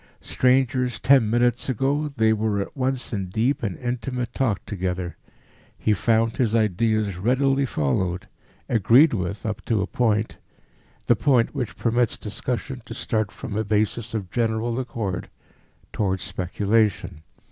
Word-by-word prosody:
Strangers 125 -2 +1
ten 125 -1 +4
minutes 120 +2 +1
ago, 140 +5 0
they 110 0 +4
were 110 -1 0
at 100 - -5
once 130 -2 -2
in 95 -3 -2
deep 115 +9 0
and 100 -7 -3
intimate 125 0 -3
talk 115 -7 -1
together. 90 -3 -3 0.6
He 110 - +1
found 115 +2 +1
his 115 -3 +1
ideas 110 -2 +1
readily 135 +6 +2
followed, 90 - -1 0.4
agreed 120 - +5
with 100 0 -3
up 105 -2 -3
to 110 -3 +1
a - - -1
point 110 0 0 0.7
the - - +4
point 125 -5 +2
which 130 -5 -4
permits 120 0 +1
discussion 125 +5 -4
to - - -8
start 110 -4 -1
from 100 - -7
a 110 - 0
basis 110 +2 -1
of 95 -5 -4
general 115 +1 0
accord 110 -8 -4 0.6
towards 95 -3 -1
speculation. 100 -2 0
110 Hz, 140 wpm, -24 LUFS, 100-125 Hz, 0.7 s, agreed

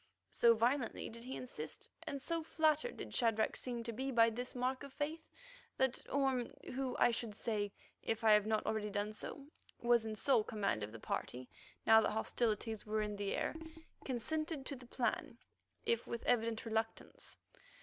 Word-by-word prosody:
So 230 -1 +6
violently 240 +2 +1
did 230 +1 -9
he 260 +2 -5
insist, 160 -11 -4 0.2
and 285 -3 -2
so 330 +4 -1
flattered 315 +5 +2
did - - -6
Shadrach 225 -3 +2
seem 240 -2 -3
to 230 0 -3
be 265 +4 -2
by 230 -3 +5
this 245 +3 -4
mark 255 +1 0
of 280 -1 -8
faith, 310 +3 -3 0.5
that 265 -1 +2
Orme, 270 -3 +1 0.2
who, 260 -1 -1
I 245 - +5
should 230 -2 -3
say, 205 -2 -1 0.3
if 225 0 -1
I 220 - +7
have 210 0 +5
not 220 -1 +1
already 215 -1 0
done 205 +1 -1
so, 275 +6 -6 0.3
was 235 -1 +4
in 220 -1 -3
sole 225 0 +4
command 200 - 0
of 105 +1 -4
the 115 - -8
party 125 +3 -3 0.4
now 220 0 +8
that - - +1
hostilities 220 0 0
were 215 0 0
in 210 -1 -3
the 200 -1 -1
air, - - 0 0.5
consented 300 +4 -2
to 280 - -3
the 250 -1 -12
plan, 245 0 -1 0.5
if 230 0 +1
with 235 - -4
evident 230 -1 +2
reluctance. 225 0 -2
235 Hz, 180 wpm, -37 LUFS, 215-265 Hz, 0.5 s, now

